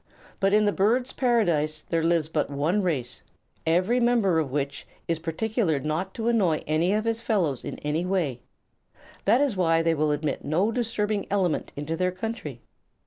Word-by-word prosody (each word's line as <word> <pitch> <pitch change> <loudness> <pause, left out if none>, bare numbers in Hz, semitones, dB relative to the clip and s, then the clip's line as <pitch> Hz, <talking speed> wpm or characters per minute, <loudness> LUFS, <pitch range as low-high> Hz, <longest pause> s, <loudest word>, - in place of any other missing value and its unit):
But 195 0 +2
in 210 +1 +4
the 205 - +3
Birds' 235 +6 +1
Paradise 170 - +1
there 165 -1 0
lives 165 -2 +2
but 155 -1 -1
one 150 +8 0
race, 140 -10 -2 0.5
every 185 +9 +3
member 235 -8 +3
of 155 -4 -1
which 140 0 -3 0.2
is 165 -1 0
quite 165 - -21
particular 185 - 0
not 155 +7 -3
to 225 0 -3
annoy 195 -10 +2
any 160 +4 +1
of 215 +2 0
his 230 0 0
fellows 175 - 0
in - - -5
any 150 +3 0
way. 170 -10 -1 0.8
That 230 +7 +4
is 280 -7 +1
why 165 -3 +2
they 165 0 +3
will 155 -1 +1
admit 150 -1 -1
no 180 +9 +1
disturbing 215 -3 -1
element 190 -5 0
into 150 +3 -3
their 180 +2 0
country. 225 +6 -6
180 Hz, 180 wpm, -26 LUFS, 155-215 Hz, 0.8 s, in